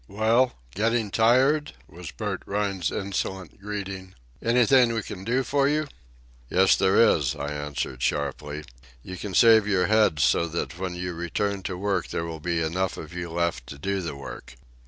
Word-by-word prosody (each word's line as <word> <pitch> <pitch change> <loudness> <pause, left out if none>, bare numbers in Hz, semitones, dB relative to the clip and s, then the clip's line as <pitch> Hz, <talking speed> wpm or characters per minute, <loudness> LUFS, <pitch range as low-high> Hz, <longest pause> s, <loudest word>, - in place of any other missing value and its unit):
"Well, 115 +5 +2 0.2
getting 110 +1 0
tired?" 130 +8 +3
was 85 0 -9
Bert 105 -1 -4
Rhine's 100 -3 -1
insolent 95 -1 -4
greeting. 95 -2 -6 0.3
"Anything 125 +1 +4
we 110 - -2
can 95 -1 -8
do 125 +6 +1
for 140 +1 +2
you?" 155 +1 +1 0.6
"Yes, 95 +1 +4
there 95 0 +3
is," 75 - +4
I 70 - -4
answered 75 -3 -4
sharply. 75 +2 -2 0.4
"You 95 - -7
can 95 0 -6
save 110 -3 +6
your 95 -3 +2
heads 105 -7 +3
so 85 - +3
that 85 +1 -4
when 95 -2 -3
you 90 0 -4
return 95 +4 -2
to 90 - -4
work 95 -1 -1
there 85 - -3
will 80 -1 -6
be 85 +1 -1
enough 90 +4 -1
of 80 +2 -9
you 85 -1 -5
left 85 -7 -2
to 70 - -9
do 100 +6 -2
the 85 -5 -5
work." 70 -3 -9
95 Hz, 175 wpm, -25 LUFS, 85-110 Hz, 0.6 s, save